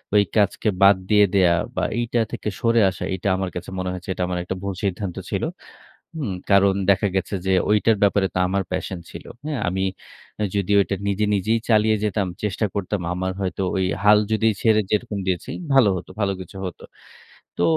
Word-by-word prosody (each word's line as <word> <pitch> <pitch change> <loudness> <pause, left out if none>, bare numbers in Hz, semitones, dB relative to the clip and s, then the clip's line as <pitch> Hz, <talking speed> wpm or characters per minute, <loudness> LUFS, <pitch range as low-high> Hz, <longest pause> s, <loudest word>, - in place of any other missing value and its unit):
ওই 105 - +6
কাজকে 105 +1 +2
বাদ 100 +1 +8
দিয়ে 105 -1 +6
দেয়া 90 -3 +5 0.2
বা - - -1 0.2
এইটা 120 0 0
থেকে - - -3
সরে 115 0 +3
আসা 90 - -6
এইটা 95 +2 -3
আমার 95 -1 -2
কাছে 90 - -6
মনে 95 0 -2
হয়েছে 90 0 -8
এটা 90 - -2
আমার 90 0 -2
একটা 95 +2 -4
ভুল 100 0 -2
সিদ্ধান্ত 95 -1 -2
ছিল। - - -2 0.7
হুম? 135 -11 -3 0.2
কারণ 100 0 +5 0.2
দেখা 100 +1 +4
গেছে 95 - -1
যে 95 - +2 0.2
ঐটার 105 +1 +4
ব্যাপারে 100 -1 +3
তো - - -3
আমার 95 +1 0
প্যাশন 90 0 -3
ছিল। - - -10 0.2
হ্যাঁ? 150 -4 -2
আমি 95 +1 -1 0.5
অ্যা 105 - 0
যদিও 100 0 +2
এটা 100 - -3
নিজে 100 +1 +1
নিজেই 110 +4 +1
চালিয়ে 110 -1 +4
যেতাম, 105 -2 0 0.2
চেষ্টা 105 +1 0
করতাম 100 0 -2
আমার 95 +1 -2
হয়তো 95 0 -2
ওই 95 -1 +1 0.2
হাল 105 0 +7
যদি 110 +1 +2
ছেড়ে 110 -1 +4
যেরকম 105 -1 -1
দিয়েছি 90 -2 -2 0.2
ভালো 130 -6 +6
হতো। 90 - -9
ভালো 100 -1 +1
কিছু 95 +1 -10
হত। 90 - -6 0.8
তো 85 - +1
100 Hz, 195 wpm, -22 LUFS, 95-105 Hz, 0.8 s, বাদ